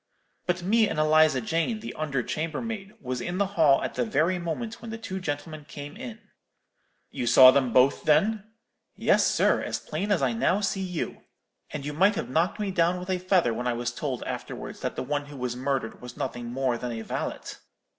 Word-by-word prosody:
But 180 0 0
me 220 +3 +3
and - - -3
Eliza 155 -3 +4
Jane, 165 - -1
the 230 - -7
under 140 -5 -2
chambermaid, 195 - -4
was 125 -1 -4
in 175 +6 -3
the 200 - +2
hall 155 -7 +4
at - - -3
the 125 - 0
very 160 +10 +1
moment 220 +7 -4
when 230 - -8
the 220 - -5
two 190 -4 -5
gentlemen 155 -2 -5
came 145 +1 -8
in.' 240 -1 -7 0.9
"'You 120 - -3
saw 130 +2 +9
them 130 -2 +2
both, 130 +4 +4
then?' 195 +8 +3 0.5
"'Yes, - - +3
sir, - - +3
as - - -2
plain 190 +7 -3
as 180 -8 +2
I 125 -3 +2
now 180 - +2
see 195 -1 -1
you. 180 -3 -4 0.5
And 145 -2 -6
you 150 - -3
might 190 +7 +4
have 125 - -4
knocked 165 +9 +1
me 205 -2 -1
down 175 0 +2
with 180 +1 -4
a 185 - 0
feather 180 -9 +2
when 125 +2 -3
I 120 - +1
was 120 +1 -2
told 130 0 -4
afterwards - - -6
that - - -3
the - - -3
one 145 +2 -2
who 145 -1 -10
was 125 -1 -3
murdered 130 -3 -2
was 125 0 -10
nothing 120 -1 -4
more 125 -1 -1
than 125 -1 -4
a 110 -1 -5
valet.' - - -4
155 Hz, 210 wpm, -27 LUFS, 130-185 Hz, 0.9 s, saw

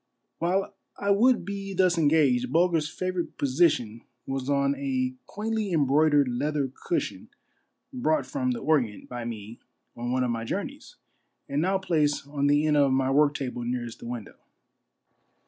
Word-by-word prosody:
While 185 +3 0 0.2
I 200 0 0
would 230 0 +4
be 195 0 -5
thus 180 -1 +3
engaged, 145 -6 +3
Bulger's 165 -1 +2
favorite 185 0 -3
position 130 -6 +1 0.2
was 135 0 -3
on 140 0 +2
a 130 -2 -1
quaintly 215 -1 -2
embroidered 145 -1 +3
leather 140 +2 -1
cushion 345 - -3 0.6
brought 160 -12 +1
from 275 -3 -2
the 240 -2 -2
Orient 130 - 0
by 120 -1 -6
me 115 -1 -7 0.4
on 120 +1 -4
one 130 0 +1
of 125 - 0
my 115 -1 -3
journeys, 115 - -5 0.5
and 140 +2 -1
now 190 +3 +2
placed 155 -7 0
on 145 -1 0
the 145 +1 +3
end 150 -1 +3
of 140 -2 +4
my 130 0 +2
work 145 +1 +4
table 125 -3 -4
nearest 120 -1 -4
the - - -9
window. 120 -3 -7
145 Hz, 155 wpm, -27 LUFS, 130-175 Hz, 0.6 s, would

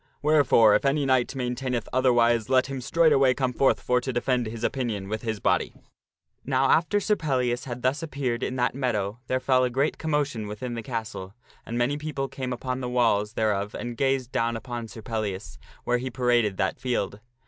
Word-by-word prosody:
Wherefore, 140 -8 +5
if 105 - +3
any 140 +1 +1
knight 130 -2 +3
maintaineth 125 -2 -2
other 130 0 +4
wise, 115 -1 +3
let 130 -1 +4
him 135 -1 -5
straightway 135 -2 +4
come 130 -3 -1
forth 135 +2 +3
for 125 0 +1
to 130 - -3
defend 125 -1 0
his 115 +1 -7
opinion 115 -8 -2
with 110 0 -3
his 110 -3 -3
body." - - 0 0.7
Now 135 0 +2
after 175 +5 +3
Sir 210 +1 +1
Pellias 125 -8 -1
had 125 -1 -6
thus 130 +3 +1
appeared 135 -6 -2
in 130 - -2
that 125 -1 +1
meadow 115 -5 -2
there 130 - 0
fell 130 -1 +3
a 125 - +2
great 135 +5 0
commotion 145 -8 -1
within 115 +4 -5
the 115 - -4
castle, 110 -5 -5 0.3
and 115 - -3
many 130 +5 0
people 145 -3 -3
came 130 -2 -5
upon 125 +1 -3
the 125 -1 -3
walls 115 -4 +2
thereof 105 -2 -1
and 120 -1 -5
gazed 135 -1 0
down 115 0 0
upon 120 0 -6
Sir 110 0 -11
Pellias 100 - -4 0.2
where 125 0 +1
he 130 +1 -4
paraded 120 -5 +1
that 95 - -1
field. 105 -5 -2
125 Hz, 195 wpm, -26 LUFS, 115-135 Hz, 0.7 s, Wherefore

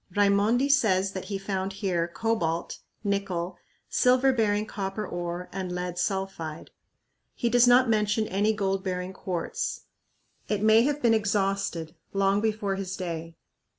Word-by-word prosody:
Raimondi 205 +6 +3
says 195 -9 +3
that 190 -1 -6
he 200 +1 -3
found 195 0 -3
here 185 -4 -1
cobalt, 170 -4 -1 0.2
nickel, 195 -4 -2 0.3
silver 255 +1 +4
bearing 210 -3 +1
copper 200 0 -4
ore, 175 0 -4
and 185 -1 -4
lead 180 0 -3
sulphide. 190 -5 -3 0.6
He 240 - 0
does 245 +1 +6
not 245 +1 +6
mention 215 0 +2
any 205 +3 +2
gold 195 -2 -1
bearing 180 -1 -3
quartz. 195 - -3 0.7
It 210 -1 0
may 220 +1 +6
have 290 0 -1
been 235 -1 +5
exhausted 195 -6 0 0.2
long 195 +1 +2
before 210 -3 -1
his 195 -1 -4
day. 165 -2 -5
195 Hz, 140 wpm, -27 LUFS, 185-220 Hz, 0.7 s, does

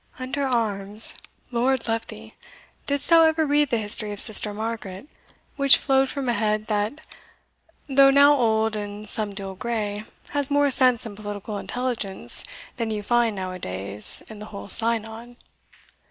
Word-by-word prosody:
"Under 260 +2 -5
arms, 210 -3 +5 0.4
Lord 250 +1 -1
love 225 0 -3
thee! - - -12 0.5
didst 285 0 -2
thou 335 -1 +5
ever 320 0 +2
read 295 -1 +1
the 235 - 0
history 210 0 -1
of 205 - -7
Sister 210 -1 +5
Margaret, 215 0 -7 0.5
which 275 -1 +5
flowed 270 -1 0
from 275 -1 -5
a 240 - +1
head, 215 -1 -2
that, 210 +8 -3 0.9
though 275 -1 +4
now 280 +1 +5
old 220 -3 0
and 205 0 -7
somedele 200 -2 0
grey, 215 -3 -4 0.3
has 285 -1 -1
more 285 -1 +1
sense 255 -3 +3
and 215 -3 -9
political 205 0 -7
intelligence 220 - 0 0.3
than 230 -2 -3
you 210 -1 -4
find 235 -1 0
now 185 -1 -5
a 185 - -9
days 100 - -1
in 215 -2 -12
the 210 - -10
whole 200 -1 -10
synod? 230 +2 -1
225 Hz, 155 wpm, -23 LUFS, 205-260 Hz, 0.9 s, arms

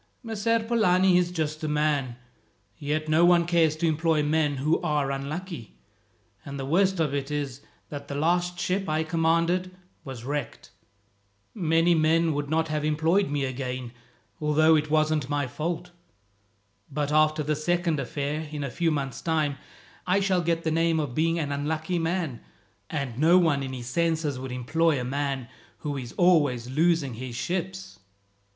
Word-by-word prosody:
"Messer 230 0 0
Polani 190 -5 +3
is 175 -1 0
a - - -10
just 155 -2 -2
man, 150 -4 0 0.6
yet 155 +2 -2
no 155 +2 +4
one 175 -1 +5
cares 165 -3 +3
to 165 +2 0
employ 160 -1 +1
men 150 -1 +1
who 150 +5 +1
are 150 -4 0
unlucky; 140 - -6 0.7
and 140 0 -7
the 135 - -3
worst 185 +5 +2
of 150 -4 +1
it 140 0 -2
is 140 -3 -3 0.3
that 140 -1 -7
the 140 - -5
last 175 +4 0
ship 190 0 -1
I 155 +1 +1
commanded 170 +3 +1 0.3
was 130 -4 -8
wrecked. 135 -3 -5 0.8
Many 165 -2 +2
men 160 0 +3
would 145 0 -3
not 160 +1 +1
have 155 -1 -1
employed 160 +5 +2
me 145 -1 -1
again, 125 -2 -4 0.5
although 155 +1 +4
it 155 0 0
wasn't 155 -2 +1
my 145 -1 0
fault. 165 +7 -4 1.0
But 145 +1 -2
after 155 0 +3
this 150 +1 -2
second 175 -2 +1
affair, 150 +3 -3
in 150 -2 -4
a 140 - -4
few 170 +5 0
months' 140 -4 -3
time, 155 -4 0 0.5
I 185 +2 +3
shall 190 -2 +1
get 165 0 0
the 160 - 0
name 165 0 +2
of 145 -5 -3
being 165 +4 +1
an 150 -3 -2
unlucky 155 +4 -2
man, 165 -6 -2 0.5
and 135 -5 -4
no 165 +4 +6
one 160 -6 +3
in 135 -1 -4
his 125 -2 -6
senses 160 0 0
would 130 0 -6
employ 150 +5 +1
a - - -3
man 135 -1 -2 0.3
who 145 -1 -3
is 125 -3 -6
always 145 -9 +2
losing 160 -2 +2
his 120 +1 -7
ships." 185 +5 -4
155 Hz, 165 wpm, -26 LUFS, 140-170 Hz, 1.0 s, no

